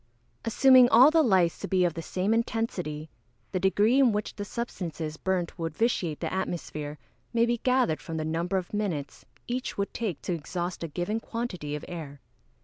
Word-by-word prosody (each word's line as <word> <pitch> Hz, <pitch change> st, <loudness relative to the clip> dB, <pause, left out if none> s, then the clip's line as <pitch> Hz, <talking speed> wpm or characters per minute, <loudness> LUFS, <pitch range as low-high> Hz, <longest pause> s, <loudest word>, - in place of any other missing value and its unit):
_ -, -, -8 dB
Assuming 255 Hz, +1 st, +7 dB
all 255 Hz, +6 st, +8 dB
the 325 Hz, 0 st, +5 dB
lights 190 Hz, -, +3 dB
to -, -, -4 dB
be 185 Hz, -2 st, +3 dB
of 170 Hz, -, +1 dB
the 165 Hz, -, -5 dB
same 185 Hz, +5 st, 0 dB
intensity, 185 Hz, -10 st, -2 dB, 0.4 s
the 185 Hz, -, 0 dB
degree 205 Hz, +7 st, +3 dB
in 260 Hz, -4 st, +5 dB
which 210 Hz, 0 st, -2 dB
the 205 Hz, -, -4 dB
substances 175 Hz, -8 st, -4 dB
burnt 180 Hz, 0 st, -2 dB
would 165 Hz, -2 st, -3 dB
vitiate 185 Hz, -9 st, 0 dB
the -, -, -2 dB
atmosphere 155 Hz, -5 st, -4 dB, 0.4 s
may 235 Hz, 0 st, +4 dB
be 235 Hz, 0 st, 0 dB
gathered 250 Hz, -11 st, +2 dB
from 165 Hz, -, -5 dB
the 155 Hz, -, -2 dB
number 170 Hz, +4 st, -1 dB
of 185 Hz, +1 st, -4 dB
minutes 185 Hz, -9 st, -3 dB, 0.2 s
each 250 Hz, +2 st, -3 dB
would 200 Hz, 0 st, -2 dB
take 205 Hz, -10 st, -3 dB
to 180 Hz, -, -1 dB
exhaust 175 Hz, +2 st, -4 dB
a -, -, -2 dB
given 175 Hz, +8 st, -2 dB
quantity 210 Hz, -12 st, -4 dB
of 150 Hz, -, -6 dB
air. 155 Hz, -5 st, -7 dB
185 Hz, 190 wpm, -28 LUFS, 165-230 Hz, 0.4 s, all